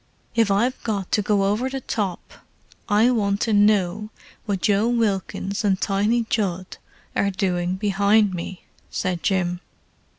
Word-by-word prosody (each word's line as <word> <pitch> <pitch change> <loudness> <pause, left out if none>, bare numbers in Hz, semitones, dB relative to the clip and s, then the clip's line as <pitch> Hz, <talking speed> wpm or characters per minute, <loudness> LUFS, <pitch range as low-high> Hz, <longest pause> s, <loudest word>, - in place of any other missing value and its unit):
"If 230 -3 +2
I've 230 +6 +1
got 200 -5 -3
to 210 - +2
go 205 -1 +1
over 210 +6 0
the 270 0 -4
top 200 -7 -4 0.6
I 220 +4 +4
want 200 -4 +1
to 225 - +1
know 205 0 +2 0.4
what 195 -3 -2
Joe 205 +2 +3
Wilkins 205 -3 -1
and 195 -2 +2
Tiny 210 +4 +1
Judd 190 -5 -2 0.4
are 200 - +2
doing 185 -2 -1
behind 200 +1 +2
me," 180 +1 -6 0.3
said 180 -2 -2
Jim. 180 -2 0
200 Hz, 140 wpm, -23 LUFS, 190-215 Hz, 0.6 s, I